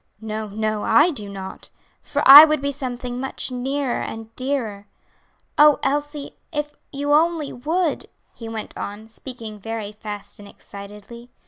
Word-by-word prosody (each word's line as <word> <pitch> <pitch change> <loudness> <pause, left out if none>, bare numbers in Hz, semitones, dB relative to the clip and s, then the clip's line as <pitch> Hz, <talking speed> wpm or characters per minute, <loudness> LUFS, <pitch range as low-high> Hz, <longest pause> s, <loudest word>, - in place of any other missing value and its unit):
"No, 215 0 -5
no, 215 +1 -2
I 310 +10 +4
do 210 -9 -6
not; 190 -1 -8 0.3
for - - -1
I 285 +3 +13
would 305 -1 +3
be 280 +1 -1
something 250 -2 -5
much 265 0 -3
nearer 265 +1 -2
and 225 0 -7
dearer. 235 -7 -3 0.7
Oh, 300 -1 +7
Elsie, 290 0 -2
if 295 -1 -3 0.2
you 285 +1 -1
only 320 -1 +2
would!" 320 +6 -1 0.3
he 230 -1 -9
went 220 -1 -6
on, 205 +2 -6
speaking 225 -2 -9
very 220 0 -5
fast 210 -1 -8
and 205 - -11
excitedly. 210 +5 -12
245 Hz, 145 wpm, -22 LUFS, 215-285 Hz, 0.7 s, I